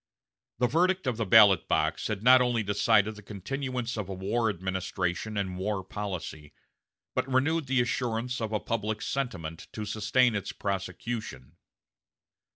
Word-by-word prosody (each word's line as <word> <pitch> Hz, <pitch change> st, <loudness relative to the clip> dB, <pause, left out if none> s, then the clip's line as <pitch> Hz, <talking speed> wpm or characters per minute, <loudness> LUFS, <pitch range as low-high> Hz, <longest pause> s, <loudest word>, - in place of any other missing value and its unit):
The 125 Hz, -, +2 dB
verdict 180 Hz, +8 st, +2 dB
of 125 Hz, -4 st, -1 dB
the 115 Hz, -3 st, -2 dB
ballot 100 Hz, -3 st, +7 dB
box -, -, 0 dB
had 105 Hz, -1 st, -3 dB
not 130 Hz, +1 st, +7 dB
only 120 Hz, -3 st, +1 dB
decided 105 Hz, +1 st, +2 dB
the 105 Hz, -, -11 dB
continuance 120 Hz, +4 st, -4 dB
of 100 Hz, -3 st, -4 dB
a 95 Hz, -, -4 dB
war 110 Hz, +5 st, 0 dB
administration 95 Hz, +2 st, -3 dB
and 95 Hz, -2 st, -2 dB
war 100 Hz, 0 st, -2 dB
policy, 85 Hz, -8 st, -6 dB, 0.6 s
but 135 Hz, -, -1 dB
renewed 145 Hz, +4 st, +1 dB
the 130 Hz, -1 st, +3 dB
assurance 120 Hz, 0 st, -2 dB
of 110 Hz, -1 st, -2 dB
a 105 Hz, -, 0 dB
public 110 Hz, -1 st, -2 dB
sentiment 85 Hz, -12 st, -4 dB
to 110 Hz, -, -4 dB
sustain 110 Hz, +4 st, +2 dB
its 100 Hz, -2 st, -3 dB
prosecution. 100 Hz, -, -4 dB
110 Hz, 150 wpm, -28 LUFS, 95-125 Hz, 0.6 s, ballot